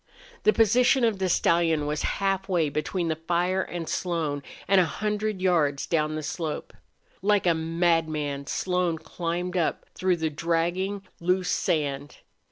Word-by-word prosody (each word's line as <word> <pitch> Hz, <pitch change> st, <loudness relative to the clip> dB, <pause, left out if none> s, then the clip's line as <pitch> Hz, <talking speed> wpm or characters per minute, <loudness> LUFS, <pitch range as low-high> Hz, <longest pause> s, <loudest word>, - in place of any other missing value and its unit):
The -, -, +7 dB
position 245 Hz, +4 st, +4 dB
of 225 Hz, -4 st, +2 dB
the 190 Hz, -1 st, 0 dB
stallion 165 Hz, -3 st, +2 dB
was 150 Hz, +1 st, -2 dB, 0.2 s
halfway 190 Hz, -5 st, +1 dB
between 165 Hz, +4 st, -2 dB
the 160 Hz, -, 0 dB
fire 175 Hz, +3 st, 0 dB
and 175 Hz, -3 st, -5 dB
Slone, 160 Hz, -5 st, -1 dB, 0.3 s
and 195 Hz, 0 st, +5 dB
a -, -, +3 dB
hundred 210 Hz, +2 st, -2 dB
yards 150 Hz, -7 st, +2 dB
up 155 Hz, -2 st, +2 dB
the 155 Hz, -, -4 dB
slope. 155 Hz, 0 st, -4 dB, 0.5 s
Like 205 Hz, 0 st, +2 dB
a 175 Hz, -, +5 dB
madman 160 Hz, -4 st, 0 dB
Slone 180 Hz, -1 st, 0 dB
climbed 175 Hz, +2 st, -4 dB
up 170 Hz, -, 0 dB
through 185 Hz, -1 st, +1 dB
the 160 Hz, -1 st, -1 dB
dragging, 175 Hz, +5 st, -1 dB, 0.2 s
loose 180 Hz, +1 st, +1 dB
sand. 145 Hz, -2 st, -1 dB
170 Hz, 145 wpm, -26 LUFS, 160-190 Hz, 0.5 s, The